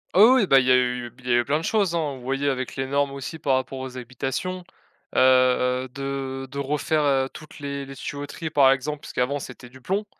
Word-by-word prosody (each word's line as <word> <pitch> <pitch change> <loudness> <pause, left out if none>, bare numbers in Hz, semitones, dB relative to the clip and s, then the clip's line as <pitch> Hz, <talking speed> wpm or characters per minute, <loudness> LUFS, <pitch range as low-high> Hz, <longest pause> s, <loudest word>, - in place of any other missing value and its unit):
Ah - - +5
oui, 260 -1 +5
oui 195 - +1
bah, 135 - +7
il 130 - 0
y - - +5
a - - +7
eu 125 -1 0
il 125 - -12
y - - +1
a 120 - +5
eu - - +2
plein 150 +2 +1
de 160 - -5
choses, 195 -5 +1
hein. 150 -5 -1
Vous - - -13
voyez 135 +3 -1
avec 130 -2 -2
les 135 - -2
normes 140 +1 +1
aussi 140 +4 -6
par 135 -2 +2
rapport 130 0 -3
aux 130 -1 -7
habitations, 135 +9 -4 0.5
heu, 130 0 +3
de 135 -1 -4
de 140 - -5
refaire, 150 +2 0
heu, 135 -2 +2
toutes 155 -1 -12
les 140 -1 -4
les 135 - -9
tuyauteries, 145 +3 -6
par 135 -3 +6
exemple, 145 +3 -1
puisqu'avant 130 +3 -2
c'était 125 -2 -10
du 130 +1 -16
plomb, 195 +8 -1
135 Hz, 240 wpm, -24 LUFS, 130-145 Hz, 0.5 s, bah